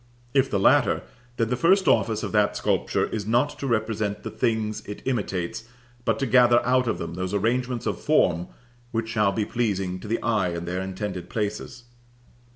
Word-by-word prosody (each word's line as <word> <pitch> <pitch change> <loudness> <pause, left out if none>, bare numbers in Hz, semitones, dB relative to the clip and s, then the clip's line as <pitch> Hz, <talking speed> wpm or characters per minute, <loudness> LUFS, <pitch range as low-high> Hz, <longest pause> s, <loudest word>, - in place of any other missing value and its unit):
If 135 -1 +3
the 100 - 0
latter, - - +4 0.3
then 115 -1 +1
the 125 - +1
first 190 +8 +3
office 110 -1 +2
of - - -3
that 105 -1 +2
sculpture - - 0
is 105 -2 -4
not 125 +6 +1
to 140 - -3
represent 110 -3 -1
the - - -5
things 110 -2 -1
it 105 - -7
imitates, 100 -6 -2 0.4
but - - +1
to 135 - -1
gather 120 0 +5
out 125 0 +2
of - - 0
them 85 - -5
those 95 +2 -3
arrangements 120 +3 0
of - - -2
form 90 - +2 0.4
which 115 -1 -2
shall 105 -3 +2
be 105 +1 -1
pleasing 95 -6 -1
to 105 - -9
the 115 +2 0
eye 105 -7 +1
in 85 0 -4
their 90 +2 -2
intended 95 -1 -5
places. 110 +3 -4
110 Hz, 185 wpm, -25 LUFS, 100-120 Hz, 0.4 s, gather